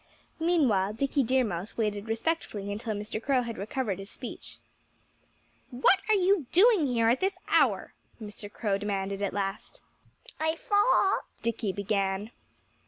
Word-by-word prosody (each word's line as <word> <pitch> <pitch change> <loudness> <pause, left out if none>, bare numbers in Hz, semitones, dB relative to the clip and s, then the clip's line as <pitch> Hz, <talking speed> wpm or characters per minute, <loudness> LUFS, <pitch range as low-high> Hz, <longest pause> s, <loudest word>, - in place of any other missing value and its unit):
Meanwhile 260 - +2
Dickie 275 +5 0
Deer 260 +1 +2
Mouse 200 -2 -4
waited 210 -1 -1
respectfully 225 -5 -2
until 215 +1 -3
Mr. 210 +1 -5
Crow 260 0 +1
had 230 -1 -6
recovered 205 -1 -2
his 195 +1 -8
speech. 245 - -8 1.1
"What 260 +9 +3
are 435 - +6
you 375 -6 +2
doing 390 -4 +5
here 230 -3 +2
at 245 - +2
this 385 +1 0
hour?" - - +2 0.3
Mr. 205 -1 -9
Crow 205 -3 -1
demanded 200 -1 -3
at 200 - 0
last. 200 - -4 0.6
"I 315 +1 +1
thought 410 +1 +3
" - - -35
Dickie 230 -3 -1
began. 200 +1 -1
225 Hz, 145 wpm, -28 LUFS, 205-290 Hz, 1.1 s, are